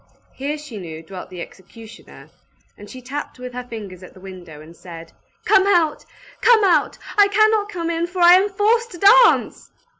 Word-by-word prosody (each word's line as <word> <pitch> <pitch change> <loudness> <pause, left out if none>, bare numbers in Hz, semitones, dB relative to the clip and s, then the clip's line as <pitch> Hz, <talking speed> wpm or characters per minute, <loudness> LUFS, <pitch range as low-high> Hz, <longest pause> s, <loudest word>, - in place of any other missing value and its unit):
Here, 285 +3 -5
she 295 -8 -10
knew, 160 -3 -9
dwelt 185 +2 -10
the 180 -2 -9
executioner; 220 +4 -16 0.4
and 205 0 -14
she 255 -1 -12
tapped 280 +3 -7
with 250 0 -9
her 250 0 -6
fingers 205 -6 -10
at 185 - -15
the - - -15
window, 180 -5 -12
and 160 +2 -15
said, 165 -1 -12 0.3
"Come 385 +1 +3
out! 340 -6 +1 0.4
Come 465 -3 +4
out! 375 -3 +1 0.2
I 405 - +6
cannot 430 0 +1
come 340 -4 -4
in, 335 +1 -2
for 360 +1 -8
I 345 0 +7
am 380 +3 +3
forced 445 +4 0
to - - -10
dance!" 460 +7 +3
290 Hz, 185 wpm, -19 LUFS, -, 0.4 s, I